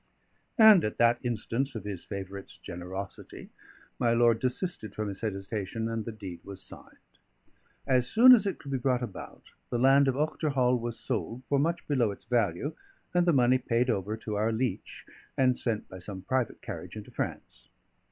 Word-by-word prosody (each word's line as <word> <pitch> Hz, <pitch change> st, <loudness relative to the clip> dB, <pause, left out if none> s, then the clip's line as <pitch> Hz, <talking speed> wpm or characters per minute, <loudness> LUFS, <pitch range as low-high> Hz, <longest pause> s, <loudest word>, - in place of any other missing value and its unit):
And 220 Hz, -6 st, +8 dB
at 105 Hz, -, -2 dB
that 120 Hz, 0 st, +4 dB
instance 120 Hz, +3 st, -2 dB
of 110 Hz, -, -5 dB
his 100 Hz, -4 st, -5 dB
favourite's 100 Hz, -1 st, -7 dB
generosity 90 Hz, +2 st, -8 dB, 0.5 s
my 120 Hz, -2 st, +3 dB
lord 115 Hz, -1 st, +4 dB
desisted 130 Hz, -, -2 dB
from 105 Hz, -1 st, -2 dB
his 100 Hz, -, -2 dB
hesitation, 105 Hz, +1 st, -3 dB
and 115 Hz, -1 st, -3 dB
the 115 Hz, -, -4 dB
deed 95 Hz, -6 st, -8 dB
was 100 Hz, -1 st, -9 dB
signed. -, -, -9 dB, 0.9 s
As 125 Hz, -2 st, +2 dB
soon 250 Hz, -, +8 dB
as 210 Hz, -5 st, +4 dB
it 190 Hz, -, -2 dB
could 140 Hz, -, -9 dB
be 135 Hz, -, 0 dB
brought 125 Hz, -1 st, +1 dB
about, 110 Hz, -5 st, -9 dB, 0.2 s
the 120 Hz, -, -1 dB
land 135 Hz, +3 st, +5 dB
of 130 Hz, -, +1 dB
Ochterhall 140 Hz, -5 st, +1 dB
was 115 Hz, 0 st, -5 dB
sold 120 Hz, 0 st, -3 dB
for 140 Hz, -, +2 dB
much 165 Hz, +4 st, -1 dB
below 130 Hz, -7 st, +2 dB
its 100 Hz, -, -8 dB
value, 120 Hz, -, 0 dB, 0.4 s
and 175 Hz, 0 st, +3 dB
the -, -, +6 dB
money 130 Hz, -2 st, +4 dB
paid 120 Hz, 0 st, +1 dB
over 105 Hz, +1 st, -2 dB
to 105 Hz, -1 st, -4 dB
our 110 Hz, +2 st, +1 dB
leech 120 Hz, +2 st, -3 dB, 0.3 s
and 130 Hz, -1 st, +3 dB
sent 110 Hz, -3 st, -2 dB
by 95 Hz, -, -10 dB
some 95 Hz, +1 st, -7 dB
private 130 Hz, +1 st, -1 dB
carriage -, -, -7 dB
into -, -, -9 dB
France. -, -, -6 dB
120 Hz, 180 wpm, -29 LUFS, 105-130 Hz, 0.9 s, And